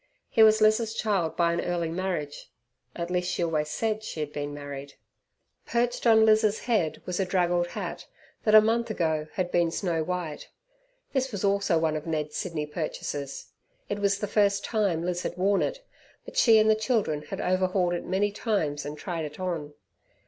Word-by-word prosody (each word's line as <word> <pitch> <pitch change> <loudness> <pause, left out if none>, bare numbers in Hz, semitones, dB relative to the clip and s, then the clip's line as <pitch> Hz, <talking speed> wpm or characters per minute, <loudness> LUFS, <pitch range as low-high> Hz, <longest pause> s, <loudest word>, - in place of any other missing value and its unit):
He 225 - +3
was 220 0 +6
Liz's 215 +1 +3
child 195 -8 0
by 170 -1 +3
an 170 - 0
early 170 -2 -1
marriage 170 -5 -4 0.5
at 170 0 -4
least, 180 0 0
she - - -1
always 155 -2 0
said 220 +4 -1
she 165 - -6
had 150 -1 -3
been 145 0 -4
married. 140 -1 -8 0.7
Perched 240 +1 0
on 220 -1 +6
Liz's 215 -1 +3
head 215 -10 0
was 180 0 -3
a - - +3
draggled 175 -1 +1
hat - - -6 0.4
that 215 -1 +4
a 215 - +11
month 230 +2 +1
ago 160 -6 -1
had 180 -2 -2
been 170 -1 +2
snow 165 -1 -1
white. 175 -3 -4 0.6
This 265 -1 0
also 200 -2 +2
was 160 - +2
one 155 -1 +1
of 155 +1 -5
Ned's 155 -2 -2
Sydney 165 -5 -3
purchases. 150 -2 -5 0.4
It 205 - -2
was 200 -1 +2
the 210 - -2
first 200 -1 +2
tune 200 -7 0
Liz 180 0 -1
had - - -4
worn 195 +2 +2
it, - - -3 0.4
but - - -11
she 225 -2 +6
and 215 0 +4
the 220 - +6
children 215 - 0
had - - -7
overhauled 185 -1 +1
it 175 - -3
many 195 +3 0
times 160 - -1
and 150 +1 -6
tried 165 -1 -4
it 150 +2 -9
on. 165 -5 -4
180 Hz, 190 wpm, -27 LUFS, 160-215 Hz, 0.7 s, a